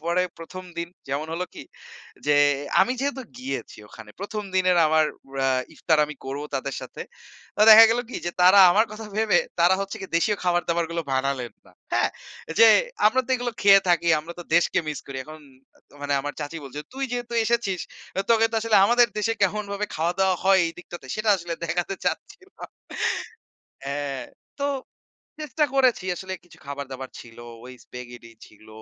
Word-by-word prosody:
পরে 170 +2 +1 0.2
১ম 185 +3 -9
দিন, 170 0 -3 0.2
যেমন 140 +3 -2
হল 175 - -3
কি? - - -8 0.6
যে, 145 - +4 0.5
আমি 250 - +3
যেহেতু 275 -1 -2 0.2
গিয়েছি 260 +2 -6
ওখানে, 110 -1 -13
১ম 210 +2 -4
দিনের 185 -1 +3
আমার 155 0 +3 0.3
এ্যা 135 0 +1 0.3
ইফতার 160 -2 +1
আমি 150 +1 -8
করব 135 +2 -5
তাদের 135 0 -3
সাথে। - - -8 0.5
তো - - -4
দেখা 220 +1 +11
গেল 235 +2 +1
কি? - - -5
যে - - 0
তারা 185 +3 +7
আমার 210 +5 +4
কথা 215 +1 -8
ভেবে 220 -1 +3 0.2
তারা 175 +2 +5
হচ্ছে, 195 +2 -4 0.2
দেশীয় 205 +5 +1
খাবার 175 -1 +2
দাবার 170 0 +1
গুলো 170 0 -2
বানালেন 130 -2 -1
না, - - -20 0.2
হ্যা? - - +2 0.5
যে 230 - +9 0.4
আমরা 255 +5 +3
তো - - -9
এগুলো 245 -1 -3
খেয়ে 195 -1 +8
থাকি, 170 -1 +2
আমরা 165 +3 -9
তো - - -9
দেশকে 170 - +2
মিস 150 - -3
করি। 135 - -7
এখন 155 +2 -11 0.6
মানে 145 0 -2
আমার 145 +1 -5
চাচী 145 +3 -5
বলছে, 140 +2 -7
"তুই 270 0 -2
যেহেতু 240 -1 -4
এসেছিস, 220 -6 0 0.5
তোকে 225 -1 +5
তো - - -6
আসলে 220 -1 +2
আমাদের 240 +2 +5
দেশে 225 +2 +1
কেমনভাবে 200 +1 -1
খাওয়া-দাওয়া 180 +3 +1
হয় 195 0 +5
এইদিকটাতে? 175 -2 -9
সেটা 215 +1 -2
আসলেন 170 -2 -6
দেখাতে 175 +3 -2
চাচ্ছিলাম।" 380 0 -5 1.2
হ্যা। 140 +1 -3 0.6
তো 280 - +1 0.8
চেষ্টা 300 +1 0
করেছি 255 -8 +3
আসলে, 190 +2 -6
কিছু 175 - -18
খাবার-দাবার 135 -2 -6
ছিল, 115 -1 -13 0.3
ওই 130 - -10
স্প্যাগেটি 120 -1 -11
ছিল, 105 +1 -20
175 Hz, 170 wpm, -24 LUFS, 145-215 Hz, 1.2 s, দেখা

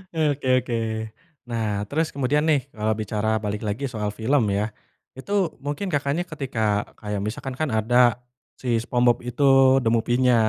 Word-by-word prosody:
Oke 145 -4 0 0.2
oke. 120 - -2 0.7
Nah, 115 -2 -1 0.2
terus 160 +5 0
kemudian 140 +2 +1
nih, 145 -3 +4 0.2
kalau 110 0 0
bicara 105 +1 -1
balik 105 0 -2
lagi 105 +7 -3
soal 105 -1 -2
film 125 +3 +2
ya. 105 - +1 0.5
Itu 165 +10 -9 0.3
mungkin, 145 +7 -2
Kakaknya, 145 +4 0
ketika, 135 -6 -5 0.2
eee, - - -16
kayak 105 -2 -3
misalkan, 130 +4 -5
kan 155 - 0
ada 115 +3 +1 0.6
si 130 - -6
Spongebob 120 0 +2
itu 130 +4 -2 0.4
The 115 - -1
Movie-nya 120 +2 +3
125 Hz, 155 wpm, -24 LUFS, 110-140 Hz, 0.7 s, nih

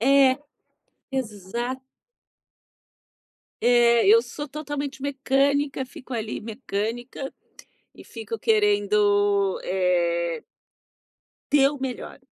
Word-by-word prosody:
É, 270 +1 +5 0.7
exata 240 +1 -4 1.8
É, 240 -1 +5
eu 450 +2 +8
sou 295 -9 -7
totalmente 290 -2 -5
mecânica, 275 0 +1
fico 255 +1 -12
ali 220 -2 -3
mecânica 230 +3 -4 0.6
e - - -13
fico 225 -1 -7
querendo, 205 -2 +2
eh 170 -3 0 1.1
Dê 290 -2 +5
o 290 - -7
melhor. 265 0 -5
240 Hz, 85 wpm, -24 LUFS, 205-270 Hz, 1.8 s, eu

